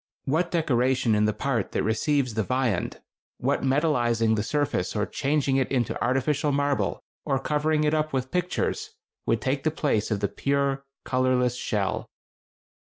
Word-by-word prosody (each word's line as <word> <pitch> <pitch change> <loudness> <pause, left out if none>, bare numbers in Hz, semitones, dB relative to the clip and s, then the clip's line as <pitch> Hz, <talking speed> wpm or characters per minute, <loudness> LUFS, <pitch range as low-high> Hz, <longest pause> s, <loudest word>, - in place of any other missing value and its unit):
What 165 +6 +1
decoration 130 -7 +2
in 105 0 +3
the 105 - +3
part 120 -5 -2
that - - 0
receives 125 +4 +1
the 110 - 0
viand, 125 -3 -1 0.4
what - - 0
metallizing 120 -6 +2
the 105 - 0
surface 125 -5 -1
or 105 -1 +1
changing 140 +1 0
it 135 - 0
into 125 -4 0
artificial 135 +4 +1
marble, 140 0 0 0.2
or 135 -3 +1
covering 150 +3 +1
it 150 0 +2
up 155 0 0
with 130 -1 -2
pictures, 180 0 -1 0.3
would 115 -1 +2
take 135 +3 0
the 155 - +1
place 140 -9 0
of 105 -3 0
the 100 - +1
pure, 140 +3 0 0.2
colorless 130 -1 +2
shell? 105 -6 -2
130 Hz, 160 wpm, -26 LUFS, 115-145 Hz, 0.4 s, in